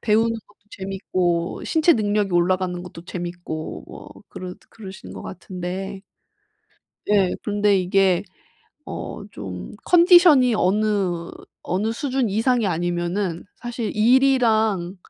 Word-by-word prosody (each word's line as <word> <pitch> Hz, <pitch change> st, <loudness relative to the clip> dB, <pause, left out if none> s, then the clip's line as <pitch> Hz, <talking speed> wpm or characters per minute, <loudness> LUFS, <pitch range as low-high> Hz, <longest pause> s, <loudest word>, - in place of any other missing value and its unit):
배우는 225 Hz, +1 st, +2 dB, 0.2 s
것도 205 Hz, -, -26 dB
재밌고 185 Hz, -3 st, -2 dB
신체 320 Hz, +1 st, +4 dB
능력이 205 Hz, -3 st, 0 dB
올라가는 180 Hz, 0 st, +1 dB
것도 175 Hz, -1 st, -11 dB
재밌고 175 Hz, -3 st, -6 dB
뭐 -, -, -11 dB, 0.2 s
그러 185 Hz, -1 st, -7 dB, 0.2 s
그러시는 195 Hz, -4 st, -10 dB
것 -, -, -8 dB
같은데. 185 Hz, +2 st, -6 dB, 1.1 s
예. 195 Hz, -3 st, +3 dB
근데 205 Hz, -1 st, +2 dB
이게 185 Hz, 0 st, +2 dB, 0.6 s
어 -, -, -6 dB
좀 90 Hz, -3 st, -7 dB
컨디션이 345 Hz, -, +6 dB
어느 195 Hz, -4 st, 0 dB, 0.3 s
어느 210 Hz, +5 st, -1 dB
수준 260 Hz, -2 st, -1 dB
이상이 225 Hz, +2 st, +1 dB
아니면은 175 Hz, +1 st, -2 dB
사실 240 Hz, -2 st, -4 dB
일이랑 220 Hz, -6 st, +3 dB
195 Hz, 245 characters per minute, -22 LUFS, 180-225 Hz, 1.1 s, 컨디션이